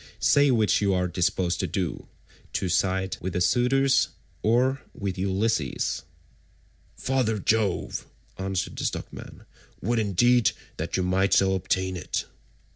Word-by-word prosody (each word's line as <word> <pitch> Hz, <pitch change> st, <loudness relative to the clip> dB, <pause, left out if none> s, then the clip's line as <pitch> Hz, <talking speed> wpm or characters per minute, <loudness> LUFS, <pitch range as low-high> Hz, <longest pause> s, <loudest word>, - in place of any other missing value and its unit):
Say 140 Hz, +7 st, +4 dB
which 110 Hz, -5 st, +3 dB
you 100 Hz, -2 st, +2 dB
are 90 Hz, 0 st, +1 dB
disposed 90 Hz, 0 st, 0 dB
to -, -, 0 dB
do—to 95 Hz, 0 st, -5 dB
side 95 Hz, +1 st, 0 dB
with 95 Hz, 0 st, -3 dB
the -, -, 0 dB
suitors, 135 Hz, +6 st, +3 dB, 0.3 s
or 130 Hz, +4 st, +2 dB
with 100 Hz, -3 st, -3 dB
Ulysses?" 95 Hz, -5 st, -1 dB, 0.9 s
"Father 130 Hz, -5 st, 0 dB
Jove," 105 Hz, -2 st, 0 dB, 0.3 s
answered 95 Hz, -1 st, -3 dB
the -, -, -2 dB
stockman, -, -, -6 dB, 0.3 s
"would 115 Hz, +4 st, 0 dB
indeed 110 Hz, +4 st, +3 dB, 0.2 s
that -, -, -2 dB
you 95 Hz, -, +1 dB
might 95 Hz, +1 st, +2 dB
so 95 Hz, 0 st, +4 dB
ordain 95 Hz, 0 st, -1 dB
it. 85 Hz, -, -3 dB
95 Hz, 125 wpm, -26 LUFS, 95-115 Hz, 0.9 s, Say